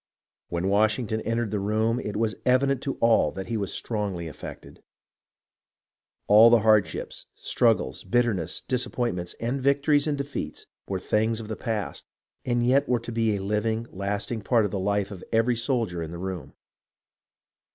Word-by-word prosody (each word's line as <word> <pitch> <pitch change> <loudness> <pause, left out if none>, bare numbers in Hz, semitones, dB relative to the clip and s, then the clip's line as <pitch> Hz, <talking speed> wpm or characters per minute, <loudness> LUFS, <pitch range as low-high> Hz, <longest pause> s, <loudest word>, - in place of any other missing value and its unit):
When 85 +2 -1
Washington 110 +2 +1
entered 115 -1 -1
the 105 - -1
room, 110 +4 +1
it 105 - -5
was 110 0 +1
evident 130 +1 +2
to 135 - -3
all 115 -10 +4
that 95 0 -6
he 115 - -1
was 100 -3 -2
strongly 100 -7 -3
affected. 75 - -10 1.4
All 110 +3 +8
the 120 -1 +5
hardships, 110 -1 +1
struggles, 65 - +1
bitterness, 115 -8 0
disappointments, 120 -8 -1
and 125 +4 -2
victories 140 +2 +3
and 145 -2 0
defeats 140 - -5 0.2
were 95 - -2
things 110 +4 0
of 110 -1 -8
the 110 - -3
past, 110 -5 -4 0.4
and 120 -1 +1
yet 130 +2 +3
were 125 -1 +3
to 115 +1 -7
be 115 -2 +1
a 95 - -4
living, 110 +3 -1
lasting 100 +4 -3
part 115 +1 +2
of 100 - -3
the 100 - -2
life 100 +1 0
of 95 -3 -8
every 115 +2 +3
soldier 115 -7 -1
in 80 - -4
the 85 - -7
room. 95 -2 -5
110 Hz, 160 wpm, -26 LUFS, 100-120 Hz, 1.4 s, All